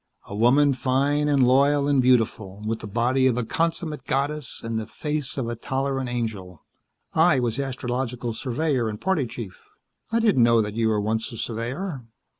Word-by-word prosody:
A 100 - -7
woman 135 +6 +4
fine 140 +3 +1
and 140 -4 +4
loyal 140 +2 +4
and 140 -2 +3
beautiful, 110 -5 +1
with 110 +1 -2
the 110 - -7
body 125 +5 +2
of 125 -2 +1
a 125 - -1
consummate 165 +3 -2
goddess 145 0 -1
and 115 -1 -2
the 110 - -6
face 150 -4 -4
of 130 -4 -2
a 120 - -3
tolerant 135 +1 -2
angel. 105 -8 -5 0.5
I 160 -4 +4
was 120 +1 -1
astrological 125 -2 -3
surveyor 130 0 -1
and 105 -1 -6
party 175 -9 0
chief." 115 -5 -8 0.5
"I 230 - +2
didn't 210 - +3
know 115 0 +5
that 105 -1 -1
you 115 0 +1
were 110 -1 +1
once 110 +2 -1
a 115 - -8
surveyor." 125 - -4
125 Hz, 180 wpm, -24 LUFS, 115-140 Hz, 0.5 s, know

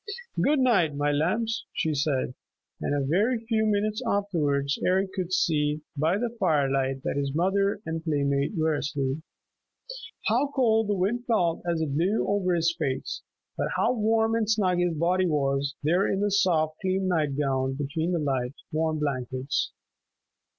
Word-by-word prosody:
"Good 300 +1 +3
night, 205 - +3
my 145 +1 +1
lambs," 215 +10 0
she 160 - 0
said, 140 -3 0 0.5
and 145 - 0
a 140 -1 0
very 205 - +2
few 220 -1 +1
minutes 215 +2 0
afterwards 155 - 0
Eric 190 +1 +2
could 185 -2 -3
see 150 -4 +1
by 160 +6 +1
the 235 +1 -3
firelight 135 -6 +1
that - - -2
his 140 0 -2
mother 195 +4 +1
and 160 0 -4
playmate 140 -1 0
were 160 0 +2
asleep. 145 -1 -2 1.1
How 240 +6 +2
cold 225 -5 +3
the 205 - +1
wind 215 +6 -1
felt 175 -8 +1
as 165 -1 -1
it 150 -3 -1
blew 185 +8 +1
over 190 -3 +1
his 170 0 +1
face! 135 -4 -2 0.3
But - - -1
how 245 - +2
warm 225 -1 +2
and 225 -2 0
snug 190 -5 +2
his 175 -2 +1
body 180 +4 +2
was, 140 -2 0
there 175 +6 +2
in 195 - 0
the 205 0 +1
soft, 160 -6 +2
clean 190 0 0
night 155 -6 0
gown 135 -2 0
between 155 +5 -2
the 175 - +1
light, 135 -4 -1 0.2
warm 160 0 0
blankets! 130 -2 -2
165 Hz, 165 wpm, -26 LUFS, 145-200 Hz, 1.1 s, Good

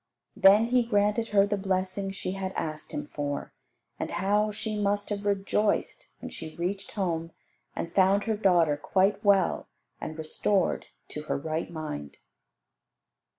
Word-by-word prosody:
Then 200 +3 +7
He 250 0 +4
granted 210 0 +1
her 200 -2 +4
the 205 0 -1
blessing 190 0 -1
she 195 -1 -4
had 190 0 -4
asked 155 -1 -4
Him 295 -1 -4
for; 145 - -4 0.5
and - - -2
how 205 +4 +1
she 215 +1 -4
must 205 0 0
have 205 -1 -3
rejoiced 200 +1 0
when - - -7
she 155 - -8
reached 185 +3 -3
home 165 -5 -2 0.4
and 170 - -4
found 195 +1 +4
her 220 -1 0
daughter 175 -7 +3
quite 190 +6 +1
well 200 -3 +3 0.3
and 155 - -5
restored 175 +4 0 0.2
to 150 - -5
her - - -1
right 155 +3 -3
mind. 150 - -6
195 Hz, 150 wpm, -28 LUFS, 170-205 Hz, 0.5 s, Then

